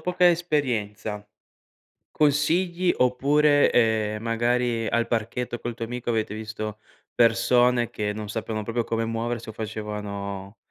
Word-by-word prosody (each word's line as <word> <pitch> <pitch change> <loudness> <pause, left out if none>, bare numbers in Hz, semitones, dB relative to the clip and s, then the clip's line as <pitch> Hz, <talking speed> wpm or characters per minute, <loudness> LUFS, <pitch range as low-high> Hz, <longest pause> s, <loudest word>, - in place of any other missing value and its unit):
poca 180 +2 +3
esperienza, 110 -11 -1 0.8
consigli 170 +5 +2
oppure, 145 +4 +4
ehm, 110 -2 +2
magari 120 0 0
al 115 0 +1
parchetto 120 +2 -2
col 120 -1 -4
tuo 115 - -4
amico 120 +1 -4
avete 110 -2 -1
visto 110 -1 -6 0.3
persone 120 +1 +3
che 105 -1 -2
non 105 0 -6
sappiano 110 0 -3
proprio 115 +2 -1
come 115 0 -1
muoversi 115 0 -3
o - - -9
facevano 105 -2 -5
115 Hz, 125 wpm, -25 LUFS, 110-125 Hz, 0.8 s, oppure